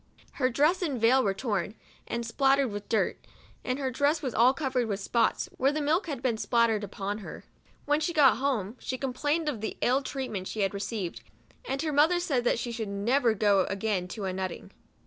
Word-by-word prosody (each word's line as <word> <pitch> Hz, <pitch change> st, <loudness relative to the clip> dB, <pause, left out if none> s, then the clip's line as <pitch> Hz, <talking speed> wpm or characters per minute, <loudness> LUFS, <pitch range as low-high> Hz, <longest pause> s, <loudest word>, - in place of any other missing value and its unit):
Her 255 Hz, -2 st, 0 dB
dress 300 Hz, +9 st, +2 dB
and 290 Hz, -8 st, -1 dB
veil 250 Hz, +4 st, +4 dB
were 195 Hz, -1 st, 0 dB
torn, 205 Hz, -3 st, -2 dB, 0.3 s
and 235 Hz, 0 st, -3 dB
spattered 270 Hz, +1 st, +2 dB
with 205 Hz, 0 st, -7 dB
dirt, 225 Hz, -, 0 dB, 0.4 s
and 255 Hz, 0 st, -1 dB
her 270 Hz, -2 st, -2 dB
dress 285 Hz, +5 st, +1 dB
was 255 Hz, -4 st, -2 dB
all 240 Hz, +3 st, +5 dB
covered 265 Hz, -4 st, -1 dB
with 200 Hz, -2 st, -2 dB
spots, 230 Hz, +3 st, +1 dB
where 270 Hz, +2 st, +3 dB
the 305 Hz, -, -2 dB
milk 315 Hz, +6 st, +1 dB
had 275 Hz, -5 st, -5 dB
been 240 Hz, -4 st, +1 dB
spattered 230 Hz, -3 st, +2 dB
upon 200 Hz, +1 st, -4 dB
her. 210 Hz, -, -9 dB, 0.4 s
When 295 Hz, +1 st, +2 dB
she 315 Hz, +2 st, -1 dB
got 295 Hz, -7 st, +5 dB
home, 245 Hz, -5 st, -1 dB
she 255 Hz, -, -4 dB
complained 290 Hz, +5 st, -1 dB
of 255 Hz, -8 st, -2 dB
the 220 Hz, -, -4 dB
ill 260 Hz, +3 st, +3 dB
treatment 255 Hz, -9 st, -4 dB
she 215 Hz, -, -3 dB
had 195 Hz, 0 st, +1 dB
received; 200 Hz, -3 st, -4 dB, 0.4 s
and 270 Hz, -, -2 dB
her 310 Hz, -2 st, -1 dB
mother 315 Hz, +5 st, +4 dB
said 275 Hz, -9 st, 0 dB
that -, -, +2 dB
she 235 Hz, +1 st, -3 dB
should 225 Hz, -3 st, -4 dB
never 230 Hz, +4 st, +1 dB
go 200 Hz, -2 st, +3 dB
again 195 Hz, -2 st, -2 dB
to 200 Hz, +2 st, -6 dB
a 190 Hz, -, -2 dB
nut 190 Hz, 0 st, -2 dB
ting. -, -, -10 dB
245 Hz, 210 wpm, -28 LUFS, 210-280 Hz, 0.4 s, all